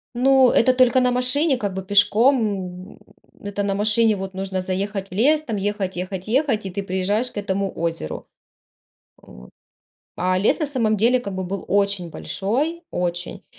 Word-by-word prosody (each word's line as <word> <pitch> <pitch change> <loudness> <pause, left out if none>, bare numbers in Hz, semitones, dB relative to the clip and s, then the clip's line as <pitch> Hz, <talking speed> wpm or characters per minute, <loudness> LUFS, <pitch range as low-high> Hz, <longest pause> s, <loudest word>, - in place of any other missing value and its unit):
Ну, 260 0 +5
это 255 +2 +4
только 255 0 +4
на 250 - +2
машине 255 +3 +2
как 205 -5 -3
бы, 190 0 -5
пешком. 205 +7 +4 0.6
М, - - -23 0.4
это 205 0 -3
на 200 -1 -1
машине, 215 +1 +2
вот, 190 0 -6
нужно 190 0 -3
заехать 195 +1 -3
в - - -41
лес, 295 +10 +3
там, 225 -8 -4
ехать-ехать-ехать, 205 - -2
и 190 - -4
ты 200 +2 -4
приезжаешь 200 +6 -1
к - - -12
этому 195 -1 -2
озеру. 165 - -4 0.9
Вот. 60 0 -15 0.7
А 185 0 +1
лес 200 - +2
на 305 - -1
самом 230 -6 0
деле 240 +5 +3
как 200 -5 -6
бы 185 0 -3
был 195 +1 -5
очень 200 -3 0
большой, 255 - -3
очень. 175 0 -3
205 Hz, 165 wpm, -22 LUFS, 190-250 Hz, 0.9 s, Ну